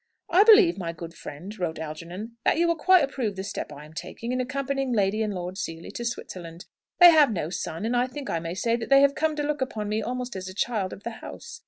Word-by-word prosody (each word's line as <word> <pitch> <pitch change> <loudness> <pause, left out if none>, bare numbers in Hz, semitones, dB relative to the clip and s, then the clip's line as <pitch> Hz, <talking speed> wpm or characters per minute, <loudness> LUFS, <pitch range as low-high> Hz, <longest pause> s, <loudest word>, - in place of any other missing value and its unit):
"I 360 +3 +6
believe, 420 - +7
my 170 -2 -3
good 165 0 -8
friend," 175 +7 -9
wrote 170 -3 -2
Algernon, 170 +8 -7
"that - - +3
you 340 +1 +3
will 335 - +2
quite 365 +1 +5
approve 255 -7 -2
the 190 - -4
step 200 - -5
I 145 +1 -10
am 155 - -15
taking, 185 +8 -6
in 255 0 0
accompanying 270 0 -2
Lord 200 -3 +2
and 215 -1 -1 0.2
Lady - - -14
Seely 165 -3 -5
to 235 - -5
Switzerland. 175 -7 -6 0.3
They 350 -1 +11
have 300 -6 +5
no 170 -5 -3
son, 170 +1 -4
and 235 +2 0
I 245 +1 +2
think 275 +2 -7
I 165 - -1
may 165 +1 -5
say 230 +4 +1
that 235 -1 -5
they 275 0 +7
have 280 0 +5
come 310 +1 0
to 295 - -2
look 295 -1 -2
upon 215 -5 -3
me 215 +1 0
almost 250 +1 -4
as 185 0 -5
a 185 - -10
child 205 -3 -1
of 205 - -10
the 235 - -4
house. 470 -1 -9
225 Hz, 255 wpm, -26 LUFS, 180-275 Hz, 0.3 s, They